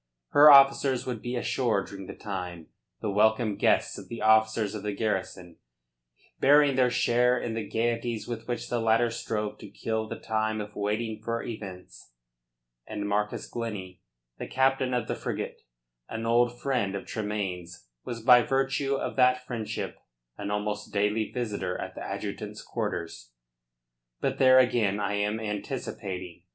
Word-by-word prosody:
Her 150 +1 +8
officers 135 -2 +6
would 120 -4 -4
be 120 +1 -3
ashore 120 -4 0
during 95 -1 -9
the - - -8
time, 90 -5 -6 0.3
the 105 - -1
welcome 110 +1 +3
guests - - +2
of - - -12
the 115 - -6
officers 110 -1 +3
of 105 - -5
the 105 0 -3
garrison, 95 -5 -3 0.8
bearing 145 0 +5
their 125 -1 +4
share 125 0 +3
in 115 - -3
the 110 -2 -4
gaieties 115 -1 -1
with 115 -2 -6
which 120 -1 -3
the 120 - -1
latter 115 +1 +3
strove 105 -2 -3
to 105 - -10
kill 110 +2 -3
the - - -6
time 110 0 -1
of 105 0 -7
waiting 105 +1 -2
for 115 +1 -2
events, 95 - -9 0.7
and 105 -1 -4
Marcus 105 +1 -1
Glennie, 95 -6 -6 0.4
the - - -5
captain 130 -1 +1
of 120 - -1
the - - -1
frigate, - - -5 0.5
an 115 0 -4
old 120 +1 +2
friend 120 -8 0
of 100 - -5
Tremayne's, 95 - -4 0.2
was 115 -2 -6
by 125 0 +8
virtue 135 +2 0
of - - -3
that 125 0 +4
friendship 115 -4 -4 0.4
an 100 0 -5
almost 105 0 -3
daily 105 +2 +1
visitor 105 -7 -3
at - - -5
the - - -8
adjutant's - - -5
quarters. 80 -7 -4 0.9
But - - -1
there 130 -1 +7
again 115 -6 +3
I 105 0 -1
am 105 +2 0
anticipating. 100 -5 -5
110 Hz, 155 wpm, -28 LUFS, 105-120 Hz, 0.9 s, Her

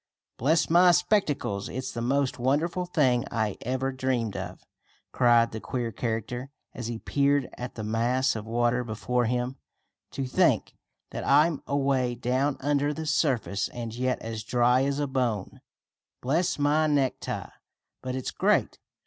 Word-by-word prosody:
"Bless 160 +6 +3
my 175 +2 +6
spectacles, 170 - 0
it's 130 +1 -4
the 115 - -5
most 135 +2 0
wonderful 155 +8 0
thing 130 -9 +2
I 110 -3 -1
ever 130 +2 -1
dreamed 125 -5 -1
of!" - - -7 0.5
cried 120 -2 +4
the 110 - -5
queer 120 -3 -3
character, 120 +4 -3 0.2
as 120 -3 -5
he 120 -1 -3
peered 140 +2 +1
at 125 0 -7
the 110 - -5
mass 120 +5 +1
of 110 0 -6
water 120 +1 +1
before 120 +2 -1
him. 125 +2 -1 0.6
"To 135 - -2
think 125 - +2 0.4
that - - -5
I'm 150 +2 +3
away 135 -3 +1
down 130 +3 0
under 145 +1 +1
the 160 - -5
surface, 135 -9 0
and 115 -2 -6
yet 130 +2 0
as 110 -1 -4
dry 125 +3 +3
as 140 0 -1
a 145 - 0
bone. 125 -7 -2 0.6
Bless 165 +8 0
my 150 +2 +2
necktie, 140 -3 -1 0.5
but 130 0 -4
it's 130 - -3
great! - - +1
130 Hz, 150 wpm, -27 LUFS, 120-140 Hz, 0.6 s, my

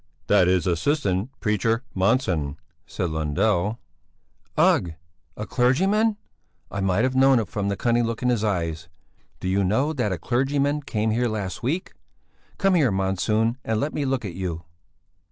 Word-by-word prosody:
"That 90 - +4
is 90 -2 +2
assistant 95 - 0
preacher 110 +2 +1
Monsson," 95 - +1 0.3
said 90 -3 -3
Lundell. 85 +7 0 0.8
"Ugh! 85 -2 +3 0.4
A - - -4
clergyman! 195 - +2 0.5
I 100 - -3
might 95 +3 +1
have 130 0 0
known 135 0 +5
it 115 - 0
from 105 -5 -2
the 100 - -2
cunning 120 0 +2
look 115 +1 -4
in 125 - +2
his 120 -3 +1
eyes. 85 -5 -2 0.5
Do - - -4
you 95 +2 +2
know 130 +11 +1
that 125 -8 -1
a 90 - -1
clergyman 140 - 0
came 110 -5 -1
here 120 +2 +1
last 105 -4 -4
week? 150 +10 -2 0.6
Come 195 -1 +2
here, 150 - +3
Monsson, 105 +5 0
and 110 -1 -1
let 145 +6 -2
me 145 - -1
look 130 -3 -1
at 95 - -5
you!" 85 -2 -4
110 Hz, 160 wpm, -24 LUFS, 95-130 Hz, 0.8 s, known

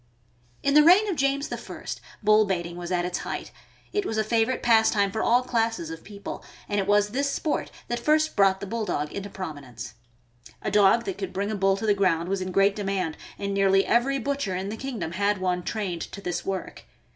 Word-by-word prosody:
In 280 - +2
the 300 - +8
reign 365 +7 +6
of 375 - 0
James 275 0 0
I., - - -8 0.4
bull 215 0 +5
baiting 175 -3 -2
was 175 0 -6
at 175 -1 +1
its 180 0 -2
height. - - -5 0.4
It 410 - +1
was 225 - -3
a 215 - +2
favorite 225 +3 +1
pastime 220 -4 +4
for 220 - -2
all 245 +2 +3
classes 225 -9 -1
of 165 - -8
people, 200 -1 -8 0.2
and 205 - 0
it 195 - -1
was 205 0 +3
this 275 +5 0
sport 295 +2 -1 0.2
that 240 0 -2
first 310 +5 +2
brought 195 -2 +4
the - - -3
Bulldog 200 -8 -2
into 200 0 -5
promi 185 -7 -6
nence. 125 -5 -9 0.7
A - - -1
dog 205 +3 +4
that 385 -1 -4
could 385 - -4
bring 200 +2 -2
a - - -1
bull 195 -1 +2
to 220 - -4
the 210 - +4
ground 180 -4 +1
was 195 -1 -1
in 185 0 -3
great 195 +2 +3
demand, 195 -5 -2 0.2
and 200 0 -3
nearly 195 0 +3
every 265 +4 +2
butcher 270 -7 -2
in 190 +2 -3
the 215 - -4
kingdom 225 -9 -4
had 200 +3 +1
one 180 -1 -1
trained 185 -3 -3
to - - -7
this 175 -3 -3
work. 195 -1 -5
200 Hz, 215 wpm, -26 LUFS, 185-235 Hz, 0.7 s, the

